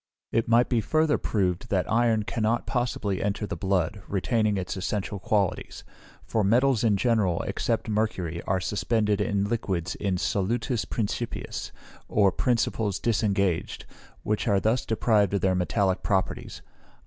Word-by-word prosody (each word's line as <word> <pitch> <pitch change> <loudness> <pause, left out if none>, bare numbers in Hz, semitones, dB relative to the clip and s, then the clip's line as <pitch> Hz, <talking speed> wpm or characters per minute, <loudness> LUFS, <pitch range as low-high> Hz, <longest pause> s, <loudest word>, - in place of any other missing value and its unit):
It 115 0 +1
might 120 +2 +4
be 120 -3 +1
further 155 +4 +2
proved, 95 -4 -1
that 95 -2 +1
iron 115 -1 +2
cannot 110 +2 -1
possibly 120 -6 -1
enter 105 +1 -1
the - - -4
blood, 95 0 -1
retaining 105 +1 +1
its 90 -1 -3
essential 100 +1 -3
qualities; 100 -1 -1 0.4
for 110 - 0
metals 120 +3 +3
in 105 -3 +3
general, 105 -6 +1
except - - -1
mercury, 95 -6 -1
are 95 0 +1
suspended 105 +2 0
in 100 -1 0
liquids 100 -6 -2
in 100 -2 -1
solutis 115 +5 -1
principiis, 115 +1 -3 0.4
or 100 -2 +3
principles 110 -2 0
disengaged, 100 -6 0 0.4
which 105 +3 -1
are 100 -3 +3
thus 110 +3 0
deprived 105 -3 +2
of 100 - 0
their 95 0 +2
metallic 95 +1 +1
properties. 95 -3 -2
105 Hz, 140 wpm, -26 LUFS, 95-115 Hz, 0.4 s, might